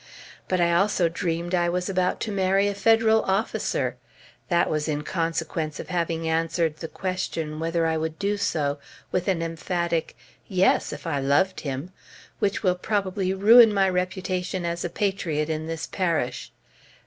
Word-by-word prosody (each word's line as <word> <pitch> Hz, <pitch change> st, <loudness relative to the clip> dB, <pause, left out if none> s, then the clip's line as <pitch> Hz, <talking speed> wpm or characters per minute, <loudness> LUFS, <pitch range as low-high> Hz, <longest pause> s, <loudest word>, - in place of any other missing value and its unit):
But 185 Hz, -, 0 dB
I 170 Hz, 0 st, +3 dB
also 185 Hz, -1 st, +2 dB
dreamed 170 Hz, +1 st, -3 dB
I 175 Hz, -1 st, +2 dB
was 180 Hz, +1 st, -1 dB
about 185 Hz, -2 st, 0 dB
to 220 Hz, -, -2 dB
marry 195 Hz, 0 st, +2 dB
a 205 Hz, -, 0 dB
Federal 220 Hz, +2 st, +4 dB
officer! 195 Hz, +4 st, -1 dB, 0.5 s
That 170 Hz, -1 st, +3 dB
was 155 Hz, 0 st, -1 dB
in 150 Hz, -1 st, -1 dB
consequence 160 Hz, -2 st, -2 dB
of -, -, -7 dB
having 165 Hz, -2 st, -1 dB
answered 165 Hz, -1 st, 0 dB
the 160 Hz, -, -6 dB
question, 165 Hz, -4 st, -3 dB
whether 165 Hz, 0 st, 0 dB
I 160 Hz, 0 st, +1 dB
would 160 Hz, 0 st, -3 dB
do 205 Hz, +1 st, 0 dB
so, 150 Hz, -7 st, -1 dB, 0.3 s
with 180 Hz, -1 st, -1 dB
an 180 Hz, -4 st, +1 dB
emphatic 165 Hz, 0 st, -2 dB, 0.3 s
"Yes! 190 Hz, -1 st, +2 dB
if -, -, -8 dB
I 155 Hz, -4 st, -1 dB
loved 145 Hz, +8 st, +2 dB
him," 140 Hz, +4 st, -5 dB, 0.5 s
which 200 Hz, +1 st, 0 dB
will 185 Hz, -2 st, +4 dB
probably 190 Hz, 0 st, -1 dB
ruin 225 Hz, +3 st, +8 dB
my 195 Hz, -2 st, +3 dB
reputation 185 Hz, 0 st, -2 dB
as 170 Hz, 0 st, -2 dB
a 175 Hz, -, -2 dB
patriot 170 Hz, -5 st, -1 dB
in 155 Hz, 0 st, -3 dB
this 165 Hz, 0 st, -4 dB
parish. 170 Hz, -9 st, -2 dB
175 Hz, 160 wpm, -25 LUFS, 160-190 Hz, 0.5 s, ruin